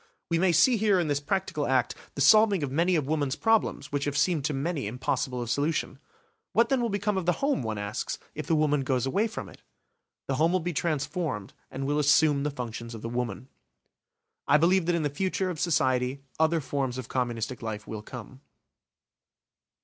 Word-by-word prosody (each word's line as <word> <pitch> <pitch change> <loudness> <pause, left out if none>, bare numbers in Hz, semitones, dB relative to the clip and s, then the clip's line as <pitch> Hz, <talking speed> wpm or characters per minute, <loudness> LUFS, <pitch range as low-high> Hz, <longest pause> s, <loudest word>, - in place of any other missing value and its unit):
We 165 - +2
may 185 0 +4
see 230 +9 +5
here 205 -3 +3
in 165 -3 0
this 145 -1 +1
practical 150 -1 -2
act 130 -2 +2 0.2
the 140 - -3
solving 205 +2 +6
of 135 - -2
many 170 +5 +2
of 155 -4 +1
woman's 145 -2 0
problems 185 -4 +1
which 145 0 -1
have 145 0 -1
seemed 165 -3 +2
to 150 - +1
many 145 -3 -2
impossible 125 +2 -2
of 115 - -7
solution. 145 -2 -1 0.5
What 230 - +4
then 270 -2 +2
will 235 - 0
become 205 -1 0
of 175 - -6
the 175 - +4
home, 280 - 0
one 110 -3 -3
asks, 105 +1 -3 0.2
if - - -6
the 165 - +3
woman 150 -2 +2
goes 130 -2 0
away 200 +12 +1
from 220 - -6
it? - - -15 0.7
The 135 - -1
home 165 +3 +3
will 185 - +3
be 175 +1 -3
transformed 150 - -2 0.2
and 135 +1 -5
will 145 +2 +1
assume 150 0 +4
the 145 - 0
functions 115 -3 -6
of 110 - -9
the 115 - -3
woman. 125 +1 -3 1.0
I 150 - +6
believe 170 +2 +3
that 175 - +2
in 165 - 0
the - - +2
future 185 +3 -1
of 160 - -7
society 130 -5 +1 0.2
other 160 +1 +3
forms 135 -2 -2
of 130 -3 -6
communistic 120 -1 -2
life 110 -2 -5
will 110 -1 -6
come. 125 +3 -10
145 Hz, 205 wpm, -27 LUFS, 130-175 Hz, 1.0 s, solving